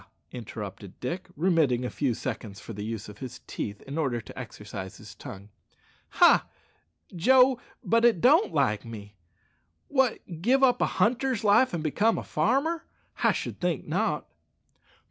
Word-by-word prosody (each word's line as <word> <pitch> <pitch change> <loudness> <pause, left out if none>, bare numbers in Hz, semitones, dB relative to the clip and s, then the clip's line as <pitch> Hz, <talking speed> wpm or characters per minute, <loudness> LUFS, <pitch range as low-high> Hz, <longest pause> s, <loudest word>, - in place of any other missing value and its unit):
interrupted 105 -5 -8
Dick, 170 +9 -4
remitting 160 -7 +2
for 125 - -2
a - - -6
few 130 -5 0
seconds 110 -6 -6
the 105 -2 -6
use 110 -1 -5
of 105 0 -12
his 130 -2 -7
teeth 105 -1 -5
in 140 +4 -5
order 130 -6 0
to 115 - -11
exercise 105 -6 -8
his 105 -1 -12
tongue 100 -1 -10 0.6
ha! - - +5 0.7
Joe, 255 +7 +5 0.2
but 230 +3 +2
it 235 -7 +5
don't 310 - +5
like 105 0 +1
me! 105 -3 -9 0.8
What, 245 - 0
give 260 +7 +3
up 250 -2 +4
a - - +3
hunter's 250 0 +1
life 210 +5 +5
and 170 -3 -3
become 210 +9 +2
a - - -4
farmer? 320 +8 0 0.4
I - - +5
should - - -4
think - - -1
not!" - - 0
145 Hz, 155 wpm, -27 LUFS, -, 0.8 s, ha